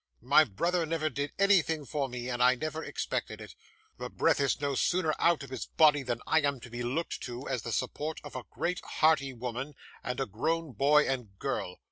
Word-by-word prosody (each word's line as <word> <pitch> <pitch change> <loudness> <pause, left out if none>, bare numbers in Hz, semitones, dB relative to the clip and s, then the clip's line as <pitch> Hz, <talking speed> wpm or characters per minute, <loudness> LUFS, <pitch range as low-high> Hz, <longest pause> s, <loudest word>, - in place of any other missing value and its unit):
My 145 +5 +6
brother 170 - 0
never 155 -1 -1
did 140 +2 -3
anything 175 -6 +3
for 140 -1 -2
me, 125 0 -5
and 125 -1 -2
I 125 +1 +6
never 155 +4 -4
expected - - -3
it; - - -10 0.5
the - - -4
breath - - +2
is 140 -1 +1
no 140 -1 -1
sooner 160 +3 +1
out 170 -4 +3
of 135 - -10
his 130 - -5
body 150 -2 +4
than 120 -3 -3
I 160 - +3
am 140 -2 0
to 120 - -11
be 120 0 -5
looked 135 +8 -2
to, 125 +2 -6
as 130 -4 -1
the 115 - -5
support 150 +8 -2
of 145 - -10
a 130 - -5
great 180 +1 -2
hearty 155 -4 +2
woman, 125 +3 -5 0.3
and 125 +1 -3
a 135 - +1
grown 160 +9 -2
boy 145 +5 +4
and 120 -7 -3
girl. 90 -1 -3
140 Hz, 210 wpm, -30 LUFS, 125-155 Hz, 0.5 s, My